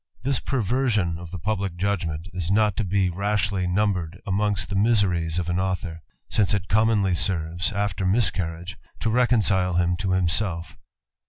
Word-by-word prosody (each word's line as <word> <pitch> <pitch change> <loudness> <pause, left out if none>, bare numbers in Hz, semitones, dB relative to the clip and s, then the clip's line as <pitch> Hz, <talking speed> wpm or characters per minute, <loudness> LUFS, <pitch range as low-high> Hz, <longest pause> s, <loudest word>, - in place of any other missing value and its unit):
This 135 0 +1
perversion 110 -8 0
of 85 -1 -9
the 90 - -6
publick 100 0 -2
judgment 85 -4 -2
is 90 -2 -3 0.6
rashly 100 -1 0
numbered 90 -2 0
amongst 105 0 0
the 100 - -3
miseries 95 -6 +2
of 90 -2 -1
an 90 +1 0
aul 95 0 0 0.6
it 100 -2 +1
commonly 105 -3 +3
serves, 85 +1 -1
after 100 -2 -2
miscarriage, 95 -4 0 0.2
to 115 - 0
recon( 120 -1 +3 0.7
himself. 90 -1 0
95 Hz, 120 wpm, -24 LUFS, 85-105 Hz, 0.7 s, commonly